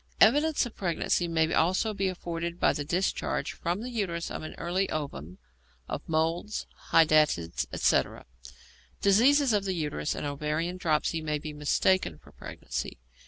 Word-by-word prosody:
Evidence 300 -1 +4
of 240 - -8
pregnancy 175 -1 0
may 160 -1 +1
also 185 +6 +2
be 195 -1 0
afforded 170 -1 -4
by - - +4
the 145 - -3
discharge 175 +6 -1
from 175 +4 -3
the 250 - -5
uterus 180 -7 -2
of - - -5
an 155 - -7
early 185 +3 -1
ovum, 95 - -5 0.5
of - - -4
moles, 165 +6 -1 0.2
hydatids, 155 - +3
etc. - - +1 0.8
Disease 255 +6 +5
of 205 -2 +2
the 190 -2 -2
uterus 150 - -2
and - - -4
ovarian 150 +5 -2
dropsy 160 -1 0
may 150 -1 -1
be 150 0 -7
mistaken 150 - +1
for - - -19
pregnancy. - - -6
170 Hz, 150 wpm, -28 LUFS, 155-195 Hz, 0.8 s, Disease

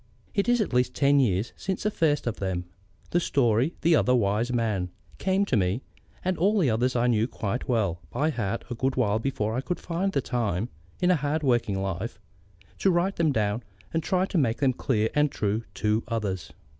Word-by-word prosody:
It 200 +3 +1
is 245 0 +4
at 205 - -2
least 125 0 +2
ten 140 0 +4
years 105 -4 +1
since 190 -1 -3
the 210 - +1
first 150 -6 +1
of 120 -2 -2
them, 95 -2 -2 0.5
the 175 - +3
story 120 -6 +2
of 165 - -12
The 165 0 +5
Other 125 -3 +3
Wise 110 +2 +1
Man, 110 -7 0 0.3
came 195 +1 +2
to 135 - 0
me; 95 +4 +1 0.4
and 185 -2 0
all 205 +5 +3
the 155 - +3
others 125 +4 +1
I 120 0 +2
knew 115 -2 +2
quite 115 0 -3
well 100 -8 +1
by 150 - 0
heart 115 -4 -2
a - - +1
good 130 +3 -1
while 110 -4 +2
before 110 -3 -1
I 130 - 0
could 175 +5 -3
find 180 +3 -1
the 160 - +1
time, 115 -5 -1 0.3
in 180 0 +4
a - - +5
hard 150 +1 -1
worked 120 -4 +2
life, 95 +2 -3 0.6
to 195 - +3
write 180 +2 +1
them 160 -3 +3
down 110 -2 0 0.3
and 165 - +1
try 185 +3 +1
to 190 - 0
make 115 -5 +1
them 135 -2 +2
clear 110 -4 +1
and 150 0 +3
true 110 0 -1
to 110 +1 +1
others. 95 -8 -3
125 Hz, 210 wpm, -27 LUFS, 105-160 Hz, 0.6 s, The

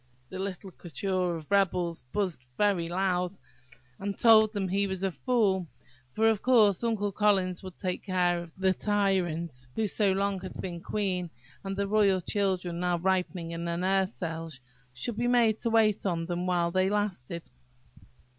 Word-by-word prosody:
the 185 - -7
little 190 0 -5
coterie 185 +3 -4 0.3
of 160 - -10
rebels 180 -4 +1
buzzed 185 -11 -2
very 195 -5 +2
loud, 180 0 0 0.7
and 200 0 -4
told 220 -2 +6
him 195 -1 0
he 200 +2 +1
was 190 -1 -4
a 195 - +1
fool, 195 -5 +1 0.4
for, 220 +10 +2
of 220 -3 +2
course, 220 -6 +4
Uncle 215 -3 0
Collins 190 -3 +1
would 185 -2 -10
take 185 -2 -3
care 175 -2 +1
that 165 - -23
the 190 0 +2
tyrant 175 -9 -1
who - - -1
had 210 -3 0
so 205 -3 +2
long 195 0 0 0.2
been 175 -2 -5
queen, 185 -4 -2 0.3
and 195 0 -4
the 200 0 0
royal 200 -2 +3
children, 185 -2 -1
now 180 -1 +1
ripening 180 -1 -1
in 170 0 -4
their 170 0 -2
nurse 190 +1 +1
cells, 165 -4 -5 0.3
should 170 - -4
be 240 +1 0
made 235 -3 +3
to 230 - -1
wait 220 -2 +3
on 170 -4 -1
them 175 +1 -3
while 175 -1 +1
they 185 +1 +2
lasted. 180 -6 -2
190 Hz, 170 wpm, -29 LUFS, 175-205 Hz, 0.7 s, told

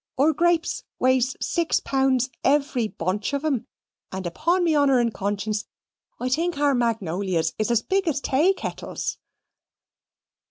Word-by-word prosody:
Our 295 +4 +4
greeps 340 +2 +1 0.2
weighs 260 0 +2
six 340 -2 +1
pounds 265 -1 +1
every 275 -4 +2
bunch 200 +5 -3
of 280 +2 -1
'em, 275 -7 0 0.4
and 190 0 -5
upon 335 - +1
me 330 -3 +2
honour 280 -3 +4
and 235 -2 +1
conscience 205 +1 -2 0.5
I 250 - -2
think 330 +5 0
our 290 -1 +3
magnolias 195 -8 0
is 215 - 0
as 235 -1 +2
big 385 -1 0
as 290 -3 +1
taykettles." 310 +8 -1
260 Hz, 135 wpm, -24 LUFS, 215-305 Hz, 0.5 s, Our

